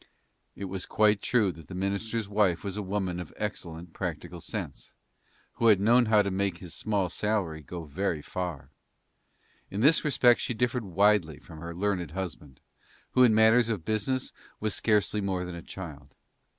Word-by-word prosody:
It 100 - -5
was 95 0 -5
quite 105 -1 +3
true 110 -6 +2
that 80 -1 -13
the 95 - -8
minister's 100 +3 -2
wife 100 -5 +2
was 100 -1 -4
a 105 - -2
woman 95 -2 -2
of 90 - -7
excellent 85 -5 -5
practical - - -5
sense, - - -6 0.7
who 115 - +5
had 105 -4 +6
known 120 +4 +4
how 105 -1 +5
to 100 - -2
make 95 -1 -1
his 90 -2 -9
small 100 -4 0
salary 95 -7 -1
go 85 +3 -7
very 80 0 -2
far. 80 -7 -5 1.0
In 100 - -3
this 150 +6 +5
respect 125 -5 +4
she 120 - -2
differed 125 0 0
widely 95 -4 +3
from 80 -3 -12
her 85 +1 -7
learned 95 -3 -1
husband, 80 -7 -6 0.5
who 130 - +3
in 120 -4 +6
matters 110 +2 +5
of 100 -8 -2
business 110 +5 -1 0.3
was 110 -2 -1
scarcely 105 +1 +1
more 95 -2 -1
than 90 - -6
a 85 - -7
child. 75 -8 -9
100 Hz, 175 wpm, -28 LUFS, 85-110 Hz, 1.0 s, had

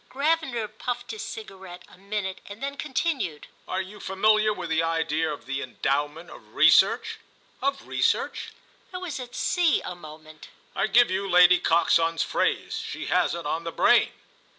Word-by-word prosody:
Gravener 280 -5 0
puffed 245 +3 -5
his 215 - -6
cigarette 190 -5 -9
a - - -17
minute 195 0 -4
and 205 +5 -9
then 280 0 -3
continued: 270 - -2 0.2
"Are 190 +1 -2
you 205 +3 -12
familiar 215 +2 +2
with 180 -5 -5
the 160 0 +2
idea 165 -1 0
of 145 - -8
the 135 0 -3
Endowment 145 +6 -2
of - - -15
Research?" - - +4 0.4
"Of 275 +1 -1
Research?" - - 0 0.4
I 365 - -5
was 360 -6 -5
at 245 -1 -8
sea 350 -3 +2
a - - -4
moment. 155 -2 -13 0.3
"I - - +1
give 235 0 +4
you 195 +1 -2
Lady 180 0 +6
Coxon's 165 0 +2
phrase. - - -1
She - - -6
has 180 -1 +2
it 170 - -7
on 160 +3 -2
the 165 - -4
brain." - - +4
190 Hz, 165 wpm, -25 LUFS, 165-240 Hz, 0.4 s, Lady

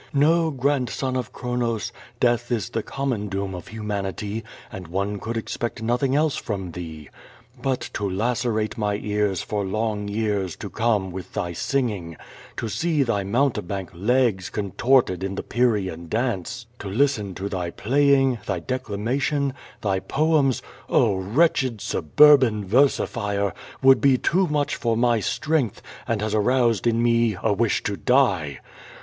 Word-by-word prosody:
No, 160 +3 +4
grandson 130 -2 -1
of 125 -2 -3
Chronos, 120 -3 -2 0.3
death 120 0 +1
is 115 -1 -1
the 115 - -1
common 125 -5 -2
doom 95 0 -3
of 90 -2 -8
humanity, 105 0 -4 0.3
and 90 -2 -8
one 100 +4 -2
could 115 +3 -4
expect 115 0 -4
noth 120 +2 0
ing 135 -1 +2
else 150 0 +2
from 95 -5 -4
thee. 80 -3 -8 0.5
But, 130 -2 0
to 100 -1 -2
lacerate 110 +1 -1
my 105 -1 0
ears 105 -2 -1
for 105 -1 -2
long 105 +1 -2
years 100 -4 -1
to - - -8
come 105 -5 +1
with 95 0 -8
thy 85 -1 -2
singing, 100 - -2 0.4
to 115 - -2
see 155 +5 +1
thy 105 -6 0
mountebank 100 - -1
legs 105 0 +1
contorted 105 -1 +1
in 95 0 -3
the - - -4
Pyrrhean 100 -9 0
dance, 120 0 -2
to 105 - -6
listen 105 -3 0
to 95 - -4
thy 90 -4 -3
playing, 135 +4 +2
thy 95 -3 -1
declama 120 +3 -2
tion, 140 -2 0 0.3
thy 95 -2 0
poems, 145 +1 +1 0.3
oh, 100 - +3
wretched 125 - +1
Suburban 110 - +4
versifier, 100 -4 +1 0.3
would 135 0 +7
be 135 -2 +5
too 185 +8 +2
much 150 -2 0
for 115 -2 0
my 120 -1 +3
strength, 140 +1 0 0.3
and 110 -2 -1
has 110 -1 -1
aroused 120 +1 +2
in 115 0 +2
me 115 -3 +2
a 110 - +3
wish 110 +1 +1
to 100 - -2
die. 95 - +2
110 Hz, 150 wpm, -24 LUFS, 100-130 Hz, 0.5 s, would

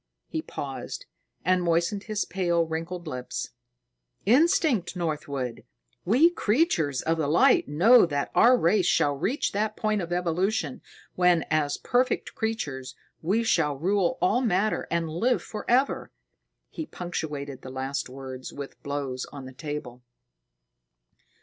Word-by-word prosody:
He 320 - -3
paused - - -6 0.4
and 185 0 +3
moistened 170 +4 0
his 215 -2 -1
pale, 175 -3 +1
wrinkled 165 +2 -4
lips. 125 -4 -5 0.7
"Instinct, 260 - +3
Northwood. 145 -7 -3 0.4
We 265 - +5
Creatures 205 - +1
of 165 0 0
the 150 - +1
Light 155 +4 +4
know 180 - +6
that 145 -2 -2
our 250 +1 +6
race 180 -1 +3
shall 145 -5 +3
reach 205 - -1
that 215 +1 -1
point 215 -2 0
in 175 0 -6
evolution 175 -3 0 0.3
when, 180 -2 +3
as 150 -2 +1
perfect 250 +1 0
creatures, 145 - -3 0.3
we 200 +8 +1
shall 160 -10 +2
rule 185 +3 +1
all 225 +7 +3
matter 215 -2 +1
and 170 -1 0
live 230 +11 0
forever." 245 +5 0 0.6
He 320 - -5
punctuated 145 -6 -5
the 130 - -9
last 130 +1 -3
words 130 -1 -8
with 140 -1 -9
blows 140 -3 -3
on 140 -2 -8
the 130 - -10
table. 140 -3 -6
170 Hz, 130 wpm, -26 LUFS, 145-215 Hz, 0.7 s, know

